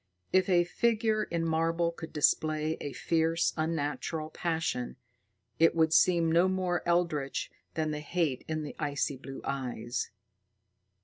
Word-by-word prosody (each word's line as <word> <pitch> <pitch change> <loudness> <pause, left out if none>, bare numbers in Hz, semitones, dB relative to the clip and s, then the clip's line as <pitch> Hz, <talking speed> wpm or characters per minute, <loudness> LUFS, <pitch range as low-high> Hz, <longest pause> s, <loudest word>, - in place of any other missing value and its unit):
If 185 0 +4
a 175 -2 +5
figure 220 +3 +1
in 165 -1 -2
marble 165 +1 +1
could 165 -1 -9
display 155 +1 +2
a 145 - -4
fierce, 165 +2 +1
unnatural 155 0 -2
passion, 160 -8 -2 0.6
it 165 0 +5
would 160 -1 +3
seem 170 -1 +4
no 170 +3 +5
more 185 -2 0
eldritch 165 -6 0 0.2
than 155 -1 0
the 150 - -3
hate 150 -3 -1
in 155 -1 -2
the 145 - -7
icy 145 -1 -1
blue 135 +1 -8
eyes. 125 -3 -3
160 Hz, 135 wpm, -30 LUFS, 150-170 Hz, 0.6 s, a